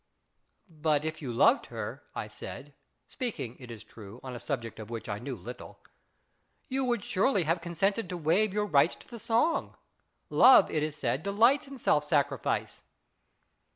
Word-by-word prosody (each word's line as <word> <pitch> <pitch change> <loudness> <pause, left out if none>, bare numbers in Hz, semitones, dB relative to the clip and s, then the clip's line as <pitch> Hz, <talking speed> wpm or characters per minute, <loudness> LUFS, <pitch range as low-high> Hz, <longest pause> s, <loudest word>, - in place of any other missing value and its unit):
" - - -46 0.2
But 150 -1 +3
if 155 0 -4
you 130 -5 -4
loved 115 - +4
her," - - -6
I - - -4
said, 145 +1 -9 0.3
speaking, 200 - -5
it 125 -2 -11
is 115 -3 -9
true, 110 +1 -12
on 130 -1 -6
a 120 - -6
subject 115 -6 -4
of 110 0 -8
which 115 -1 -6
I 105 -1 -3
knew 130 +2 -5
little, 120 +5 -10 0.5
" - - -45
you 265 0 0
would 240 -5 0
surely 200 0 +1
have 165 +2 0
consented 185 +4 -1
to 180 - -4
waive 180 +6 +2
your 210 +1 0
rights 155 -3 +3
to - - -17
the 235 - -9
song. 235 +10 0 0.5
Love, 260 - +7
it 155 - 0
is 155 0 -2
said, 130 -1 -1
delights 225 - +3
in 275 0 -9
self 150 - +2
sacrifice." 145 -4 -1
155 Hz, 180 wpm, -29 LUFS, 125-210 Hz, 0.5 s, Love